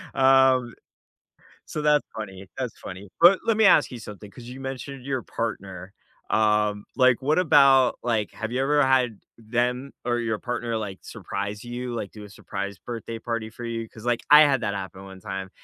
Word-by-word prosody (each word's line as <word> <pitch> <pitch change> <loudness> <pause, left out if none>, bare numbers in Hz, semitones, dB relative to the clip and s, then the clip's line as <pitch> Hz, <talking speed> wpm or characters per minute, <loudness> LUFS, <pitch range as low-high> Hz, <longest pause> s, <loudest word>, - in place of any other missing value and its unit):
Um, 130 -2 +4 0.9
so 150 - -4
that's 150 -1 +3
funny, 95 -3 -7
that's 125 -4 -4
funny, 95 +2 -9
but 180 +3 +7
let 225 -2 +2
me 220 - +4
ask 155 -7 +5
you 125 - -7
something, 105 -2 -10
'cause 120 - -13
you 125 +2 -9
mentioned 135 0 -7
your 130 -3 -2
partner, 95 -5 -5 0.4
um, 105 -1 +2
like, 130 -2 +4
what 150 +5 +2
about 140 -6 +5
like, 110 -4 0
have 115 0 -5
you 125 - 0
ever 145 +1 +3
had 125 -5 +2 0.2
them 125 +4 -2
or 120 0 0
your 110 -2 -2
partner, 120 -1 -3
like, 100 -4 -5
surprise 100 +2 -6
you, 120 0 -5
like, 105 -4 -5
do 105 -1 -10
a 105 - -12
surprise 100 0 -6
birthday 115 -1 -6
party 115 -1 -4
for 120 +2 -9
you? 115 -1 -4
'Cause, 110 +1 -14
like, 120 -1 0
I 150 +1 +10
had 140 -4 +3
that 100 - -1
happen 95 0 -7
one 95 -1 -11
time, 95 -2 -6
120 Hz, 190 wpm, -25 LUFS, 105-130 Hz, 0.9 s, I